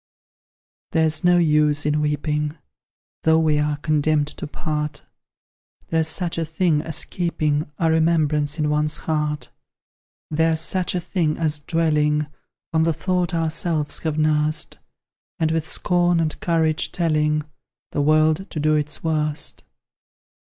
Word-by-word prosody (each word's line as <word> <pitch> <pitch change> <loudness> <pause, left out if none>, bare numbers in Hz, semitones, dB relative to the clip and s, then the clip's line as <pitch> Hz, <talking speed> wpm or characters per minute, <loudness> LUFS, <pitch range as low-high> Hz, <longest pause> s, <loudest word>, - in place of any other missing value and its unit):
There's 160 -2 +2
no 175 0 +5
use 150 -3 +3
in 150 0 +1
weeping, 150 +1 -1 0.6
Though 160 0 +4
we 155 -2 +2
are 150 0 0
condemned 150 0 +1
to - - -4
part: 150 -1 -4 0.9
There's 160 -1 +2
such 170 +1 -1
a - - 0
thing 160 -1 +1
as 160 -1 -4
keeping 155 -4 -1
A 165 -1 +2
remembrance 155 -2 +2
in 150 -1 0
one's 150 +1 +1
heart: 150 -1 -1 0.8
There's 160 +1 +2
such 185 +2 -1
a - - +1
thing 165 -3 -1
as 155 -2 -1
dwelling 150 -1 +1 0.5
On 160 - +3
the 165 0 +2
thought 180 +1 -1
ourselves 160 -1 0
have 155 -2 -2
nursed, 155 0 +1 0.6
And 160 -1 +1
with 160 -1 -1
scorn 175 -1 +2
and 160 -2 -1
courage 160 -2 +1
telling 150 -3 +1 0.5
The - - 0
world 155 +4 +2
to 155 - -5
do 155 +1 +2
its 150 -1 -1
worst. 155 -2 -1
155 Hz, 135 wpm, -22 LUFS, 150-165 Hz, 0.9 s, no